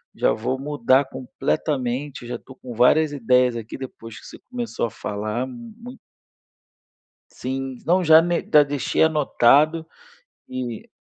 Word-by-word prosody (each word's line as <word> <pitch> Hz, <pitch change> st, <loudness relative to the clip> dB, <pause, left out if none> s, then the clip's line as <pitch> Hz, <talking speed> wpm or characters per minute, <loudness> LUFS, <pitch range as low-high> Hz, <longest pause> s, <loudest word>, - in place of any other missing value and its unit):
já -, -, +2 dB
vou 130 Hz, +4 st, -3 dB
mudar 135 Hz, -1 st, +2 dB
completamente. 130 Hz, 0 st, -3 dB
Eu 120 Hz, -, -9 dB
já 120 Hz, -, -3 dB
tô 130 Hz, -, -15 dB
com 125 Hz, -2 st, -10 dB
várias 145 Hz, +6 st, +4 dB
ideias 125 Hz, -2 st, +2 dB
aqui, 115 Hz, +1 st, -7 dB
depois 115 Hz, -6 st, -9 dB
que -, -, -16 dB
você -, -, -12 dB
começou 240 Hz, -, -3 dB
a -, -, -8 dB
falar, 105 Hz, +3 st, -4 dB
m 235 Hz, -, -10 dB
mui 245 Hz, +2 st, -11 dB, 1.3 s
Sim. 130 Hz, 0 st, -5 dB
Não, 180 Hz, +3 st, +3 dB
já 160 Hz, 0 st, +8 dB
ne 175 Hz, 0 st, 0 dB
já 150 Hz, -1 st, +8 dB
deixei 145 Hz, 0 st, -1 dB
anotado 155 Hz, +1 st, +3 dB, 0.6 s
e 125 Hz, -3 st, -6 dB
130 Hz, 145 wpm, -22 LUFS, 120-155 Hz, 1.3 s, já